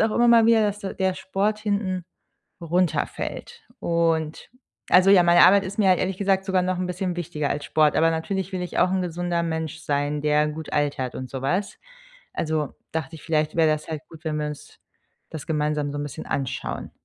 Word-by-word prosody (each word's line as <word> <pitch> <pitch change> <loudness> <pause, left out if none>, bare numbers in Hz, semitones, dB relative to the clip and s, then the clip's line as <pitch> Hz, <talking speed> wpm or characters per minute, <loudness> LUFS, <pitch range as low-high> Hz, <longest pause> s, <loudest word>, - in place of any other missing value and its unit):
auch 220 0 +2
immer 240 0 +4
mal 230 -1 +6
wieder, 225 -1 +5
dass 205 0 0
der 195 - -5
der 190 -1 +1
Sport 205 +3 -1
hinten 200 -4 -2 0.6
runterfällt. 180 - -2 0.2
Und, 165 -2 0 0.4
also, 185 +2 +6
ja, 185 -3 +7
meine 175 0 +6
Arbeit 200 +1 +5
ist 200 +3 -7
mir 190 -3 +5
ehrlich 185 +1 -2
gesagt 195 -1 +1
sogar 185 -1 +2
noch 185 0 -1
'n 185 - -1
bisschen 180 0 -3
wichtiger 150 -4 -3
als 145 - -2
Sport, 155 -1 +3
aber 165 +1 +4
natürlich 190 +4 -3
will 185 -1 -3
ich 180 - -4
auch 185 - +4
'n 190 -1 0
gesunder 175 0 -2
Mensch 160 -1 -3
sein, 145 0 -1
der 150 0 +2
gut 155 +1 -7
altert 145 -4 -1
und 130 -1 -6
sowas. 175 +10 -2 0.6
Also, 155 -2 -2 0.2
dachte 160 -1 -4
ich, 155 - -13
vielleicht 155 -2 0
wäre 160 -2 +4
das 155 0 -2
halt 155 -2 -4
gut, 160 0 -14
wenn 155 -1 -1
wir 150 0 -2
uns 150 -1 -9 0.5
das 155 - -7
gemeinsam 150 -2 -1
so' 145 - -5
n - - -2
bisschen 145 - -7
anschauen. 135 -2 -3
170 Hz, 200 wpm, -24 LUFS, 150-190 Hz, 0.6 s, ja